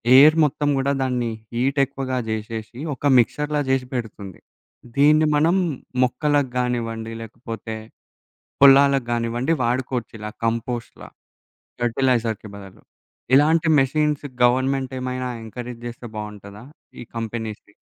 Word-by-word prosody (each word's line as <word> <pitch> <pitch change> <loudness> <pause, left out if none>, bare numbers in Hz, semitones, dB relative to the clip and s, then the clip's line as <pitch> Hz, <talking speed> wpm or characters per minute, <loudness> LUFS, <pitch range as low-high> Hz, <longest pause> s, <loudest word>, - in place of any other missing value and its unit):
Air 150 +4 +8
మొత్తం 145 0 -1
గుడా 135 +1 +1
దాన్ని 125 -3 -1 0.2
హీటెక్కువగా 135 0 0
జేశేశి, 110 +2 -5
ఒక 135 - -8
మిక్సర్‌లా 150 +5 +1
జేశి 130 -1 +1
పెడుతుంది. 105 -6 -6 0.6
దీన్ని 150 +2 +5
మనం 160 +5 +3 0.5
మొక్కలకి 145 +1 +1
గానివ్వండి 115 -2 -2
లేకపోతే, 115 0 -7 0.9
పొలాలకి 140 -2 +6
గానివ్వండి 120 +6 0
వాడుకోవచ్చు. 125 0 -2
ఇలా 105 0 -6
కంపోస్ట్‌లా. 115 +1 -3 0.7
ఫెర్టిలైజర్‌కి 120 -3 0
బదులు. 95 -2 -13 0.5
ఇలాంటి 155 +4 +4
మెషిన్స్ 150 +2 +1 0.2
గవర్నమెంటేమైనా 130 0 0 0.2
ఎంకరేజ్ 120 +1 -8
జేస్తె 120 0 -7
బావుంటదా? 105 -1 -8 0.4
ఈ - - -6
కంపెనీస్‌ని. 110 -2 -5
125 Hz, 100 wpm, -22 LUFS, 115-135 Hz, 0.9 s, Air